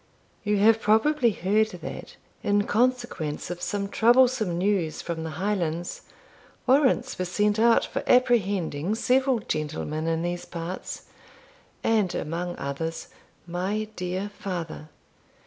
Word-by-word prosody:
You 210 -1 +1
have 220 +2 +5
probably 235 +5 +3
heard 210 +2 +2
that, 180 -5 -8 0.3
in 205 0 +2
consequence 230 -11 -1
of 175 0 -6
some 200 -1 -2
troublesome 235 -4 +3
news 180 -4 0
from 165 -2 -4
the 160 - -4
Highlands, 175 -3 -2 0.6
warrants 260 -3 +3
were 185 - 0
sent 210 +4 +1
out 230 0 +5
for - - -3
apprehending 205 - +2
several 260 +2 +2
gentlemen 155 -5 -3
in 165 0 0
these 175 0 -3
parts, 170 +2 -6 0.8
and, 210 -6 +2
among 175 +3 -3
others, 160 +4 -4 0.4
my 190 +5 -2
dear 185 +3 -3
father. 170 -5 -5
195 Hz, 120 wpm, -26 LUFS, 170-220 Hz, 0.8 s, have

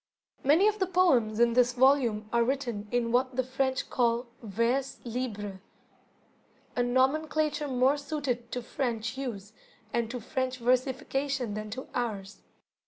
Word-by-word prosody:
Many 315 +9 +5
of 425 0 +1
the 375 - +1
poems 265 -13 +3
in 235 0 +4
this 245 0 +4
volume 245 -5 +3
are 235 0 +4
written 240 -5 -2
in 240 0 0
what 255 +1 +1
the 260 - +1
French 260 +1 -1
call 240 0 +1 0.2
"Vers 235 +5 0
Libre", 210 -5 -4 1.1
a 245 - +2
nomenclature 295 +4 +1
more 260 +2 +3
suited 280 -5 -3
to 245 - -3
French 235 -2 -2
use 220 -6 -5 0.4
and 235 -2 0
to 250 +1 -4
French 255 +2 -2
versification 255 0 0
than 215 0 -5
to 255 +5 -6
ours. 205 -5 -3
250 Hz, 140 wpm, -29 LUFS, 230-270 Hz, 1.1 s, Many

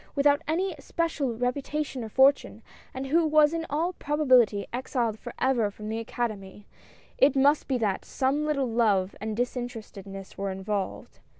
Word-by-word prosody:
without 285 0 +3
any 360 +4 0
especial 280 -6 -2
reputation 265 +2 -2
or 220 - -6
fortune, 265 -3 +3 0.3
and 260 +1 -5
who 325 +5 +3
was 305 0 +4
in 330 0 -3
all 330 +5 0
probability 255 - +3
exiled 240 -3 -2
forever 245 -5 0
from 210 +1 -8
the 225 +1 -2
Academy 210 -4 -5 0.3
— - - -27
it 275 0 +5
must 285 +3 +3
be 265 - +1
that 210 -5 -1
some 275 +3 0
little 290 -3 0
love 210 -5 +1
and 215 0 -3
disinterested 240 -5 -4
ness 195 -1 -9
were 200 0 -1
involved. 195 +1 -4
250 Hz, 160 wpm, -27 LUFS, 215-290 Hz, 0.3 s, it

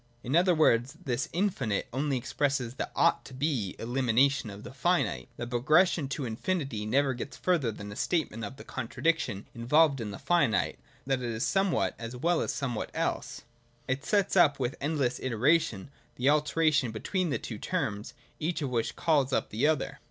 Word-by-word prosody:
In 130 +5 -1
other 175 +1 +4
words, 135 -1 +3
this 125 -2 -1
infinite 155 - -1
only 135 +1 0
expresses 135 -1 -1
the - - -4
ought - - +3
to 130 - -10
be 130 -8 -1
elimination 125 +1 +1
of 100 +1 -9
the - - -9
finite. 130 - 0
The 120 - -4
progression 150 +6 +3
to 140 0 -3
infinity 120 - -2
never 135 +4 +2
gets 125 +3 -7
further 165 -10 +1
than 105 -1 -8
a - - -8
statement 150 -9 -1
of - - -5
the - - -10
contradiction 130 -3 -1
involved 135 +3 +3
in 110 - -4
the 100 - -6
finite, 155 -11 +1
viz. - - -32 0.2
that 135 -1 0
it 120 - -2
is 115 +1 -1
somewhat 195 -2 +1
as 115 +1 -6
well 170 +7 +1
as - - -1
somewhat 125 -6 -3
elseT} - - -2 0.4
It 130 +1 -1
sets 200 +2 +1
up 150 -7 +5
with 125 0 -1
endless 140 -4 0
iteration 130 - +1 0.2
the 130 +3 +2
alternation 150 -3 +2
between 175 - -2
these 145 - -2
two 110 -3 -6
terms, 105 0 -3 0.2
each 160 0 -1
of 135 - -2
which 115 -2 -1
calls 145 -5 +2
up - - 0
the 120 +8 +2
other. 140 -2 -1
135 Hz, 180 wpm, -29 LUFS, 115-155 Hz, 0.4 s, up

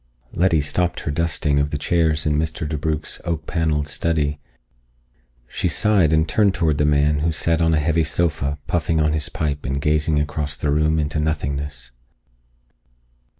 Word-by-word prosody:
Letty 85 -3 +2
stopped 85 +5 -1
her 75 - -3
dusting 75 -2 0
of 70 0 0
the 75 - -3
chairs 80 -1 +1
in 75 -1 +1
Mr. 80 0 -2
DeBrugh's 75 0 -2
oak 85 -2 -3
paneled 80 -3 -1
study. 75 -1 -1 1.1
She 90 - -2
sighed 95 -1 +3
and 80 0 +2
turned 100 +3 +2
toward 80 -4 0
the 75 - +3
man, 75 0 +2
who 80 +2 0
sat 85 +1 +1
on 80 -1 +3
a - - +2
heavy 80 +2 +1
sofa, 75 -3 -1
puffing 80 +1 0
on 75 0 +2
his 80 -1 -1
pipe 75 -2 -3
and 70 +1 -2
gazing 75 +1 +1
across 75 0 -3
the 70 +3 -1
room 75 +1 +2
into 75 0 -1
nothingness. 75 -3 -3
75 Hz, 165 wpm, -21 LUFS, 75-80 Hz, 1.1 s, sighed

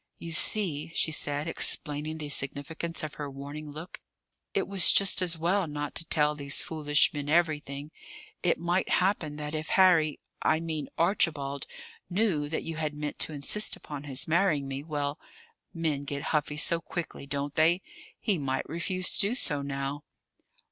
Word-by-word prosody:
"You 165 - -7
see," 165 -3 +1
she 160 - +2
said, 145 0 +1
explaining 155 -1 +1
the 150 -2 -5
significance 145 +5 -2
of 155 - -4
her 145 - -3
warning 145 +2 -7
look, 155 +4 -9 0.5
"it - - 0
was 195 -3 +6
just 195 -1 +4
as 175 -2 +1
well 175 +3 +1
not 145 -1 -4
to 165 - -3
tell 150 -2 +3
these 140 -2 -1
foolish 150 -2 +2
men 145 -1 -4
everything. 150 -3 0 0.5
It 175 - +2
might 175 +3 0
happen 180 -5 +1
that 150 0 -5
if 155 0 -3
Harry 165 -5 +5 0.2
I 155 - +3
mean 160 -3 -4
Archibald 155 -6 +1 0.4
knew 180 -7 +1
that 160 - -2
you 165 -1 -5
had 155 -1 -2
meant 150 0 -5
to 155 - +1
insist 150 +9 +1
upon 145 -1 -8
his 135 -2 -3
marrying 160 -4 +2
me 135 0 -4
well, 145 -2 -2 0.5
men 155 -4 -2
get 140 0 -3
huffy 150 -1 0
so 165 +2 +5
quickly, 170 -4 -5
don't 140 0 -3
they? 170 +4 +3 0.4
he 200 -6 0
might 135 -2 -2
refuse 185 +2 -1
to - - 0
do 205 +5 +1
so 145 - 0
now." 140 +1 -4
155 Hz, 170 wpm, -29 LUFS, 145-170 Hz, 0.5 s, was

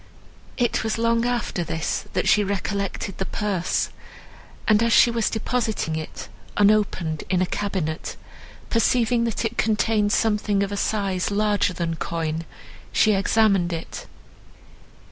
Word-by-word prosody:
It 240 -3 +1
was 220 0 -1
long 230 +1 +2
after 240 -7 -1
this, 160 -1 -2
that - - 0
she 210 - +5
recollected 200 -1 -3
the 190 - -1
purse; 200 -5 -1 0.8
and 215 0 +5
as 230 0 +2
she 235 - +6
was 230 -1 +1
depositing 220 -7 -1
it, 155 -1 -6 0.3
unopened, 200 -7 +2
in 185 -1 +2
a 185 - +2
cabinet, 180 -5 -3 0.6
perceiving 235 0 +2
that 230 0 -2
it 225 +1 -3
contained 215 -1 +2
something 210 -2 +1
of 200 - -3
a - - -2
size 195 -3 -1
larger 205 -2 +1
than 170 -2 -3
coin, 165 -1 -3 0.5
she 215 - +4
examined 195 -2 +2
it. 165 -1 -6
205 Hz, 135 wpm, -23 LUFS, 180-225 Hz, 0.8 s, she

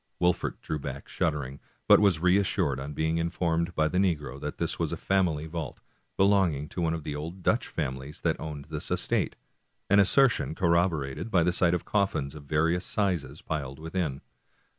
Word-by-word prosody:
Wolfert 90 0 +1
drew 75 - -3
back 70 0 -6
shuddering, 70 -3 -2 0.3
but - - +8
was 100 -5 +4
reassured 90 -6 +2
on 70 +2 -5
being 80 +2 0
informed 85 0 -1
by 80 0 +3
the 90 +4 0
negro 75 -7 -1
that - - -5
this - - -2
was - - 0
a - - -3
family 90 -6 +1
vault, 80 0 -5 0.4
belonging 95 -7 +3
to 90 - -4
one 80 -1 +1
of 80 - -6
the 75 - -4
old 85 +5 -6
Dutch 115 - +2
families 70 +1 -4
that 80 -2 0
owned 75 -3 -6
this - - -4
estate, - - 0 0.6
an 100 - +7
assertion 125 +6 +3
corroborated 85 -3 +1
by 90 -7 +3
the 90 +1 +2
sight 90 -1 +3
of 90 - -4
coffins 80 -9 0
of 75 -2 -11
various 80 +5 +1
sizes 85 -8 -1
piled 70 -4 -4
within. 80 -3 -3
80 Hz, 180 wpm, -28 LUFS, 75-90 Hz, 0.6 s, but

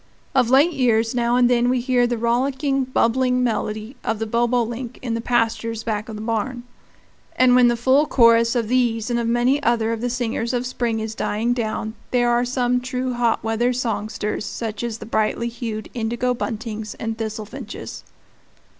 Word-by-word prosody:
Of 250 -3 +3
late 280 +7 +5
years 230 -5 +2
now 240 -1 +1
and 250 -1 +5
then 245 0 +3
we 255 0 +2
hear 245 0 +2
the 240 0 -1
rollicking, 265 +4 0
bubbling 250 0 +1
melody 220 +1 -2
of 225 - -1
the 225 - -2
bobolink 240 +1 -1
in 240 -3 -2
the 230 - -2
pastures 230 -1 0
back 215 -1 -3
of 220 - -6
the 215 - -6
barn; 235 +2 -2 0.7
and 255 -1 +5
when 250 -1 +6
the 240 0 +2
full 265 +5 +3
chorus 230 -2 +4
of 235 -3 0
these 240 -1 +1
and 235 - +1
of 235 - -1
many 240 +4 +2
other 230 -3 +1
of 225 -1 -3
the 245 - -1
singers 235 -1 -2
of 245 0 -1
spring 240 -3 -1
is 220 0 -4
dying 220 +2 -1
down, 220 -2 -3 0.2
there 240 -1 +2
are 240 +1 +2
some 250 0 0
true 255 0 -2
hot 240 -3 +1
weather 225 +2 +1
songsters, 215 -3 -2
such 220 -1 -5
as 235 -2 -3
the 215 - -9
brightly 225 +1 0
hued 230 -2 -5
indigo 240 +1 -1
buntings 220 -2 -5
and 225 0 -4
thistlefinches. 220 +2 -6
235 Hz, 180 wpm, -22 LUFS, 225-250 Hz, 0.7 s, when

